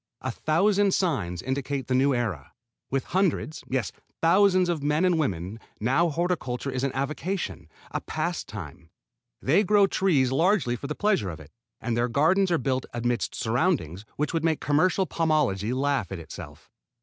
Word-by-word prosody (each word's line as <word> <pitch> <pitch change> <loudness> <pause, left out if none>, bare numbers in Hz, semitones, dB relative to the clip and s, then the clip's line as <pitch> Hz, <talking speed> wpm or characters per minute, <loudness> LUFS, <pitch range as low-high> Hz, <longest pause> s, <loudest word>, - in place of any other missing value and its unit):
A 130 - -2
thousand 195 - +2
signs 95 - -1
indicate 135 +1 -2
the 130 - -2
new 135 +2 +3
era. 95 - -3 0.4
With 135 0 0
hundreds 180 -4 0
yes 130 -5 -1 0.3
thousands 185 +2 +4
of 170 -4 -1
men 150 +5 +2
and 175 -3 +3
women 95 - -2 0.2
now 135 +10 +2
horticulture 145 -6 -2
is 130 0 -2
an 135 - +1
avocation, 155 +7 -3 0.2
a - - -2
pastime. 85 -1 -5 0.5
They 165 +10 +4
grow 205 0 +5
trees 165 -10 +2
largely 160 -4 +2
for 140 - -6
the 150 - -4
pleasure 200 - +1
of 80 - -7
it; 75 -1 -14 0.3
and 120 -2 -2
their 120 +1 +1
gardens 170 +10 +3
are 170 - +3
built 130 -4 -1
amidst 120 0 -1
surroundings 110 - 0
which 150 +3 -1
would 165 -1 0
make 160 -2 +1
commercial 180 +6 +2
pomology 150 - +1
laugh 135 -7 0
at 95 - -4
itself. 80 - -10
140 Hz, 160 wpm, -26 LUFS, 120-175 Hz, 0.5 s, grow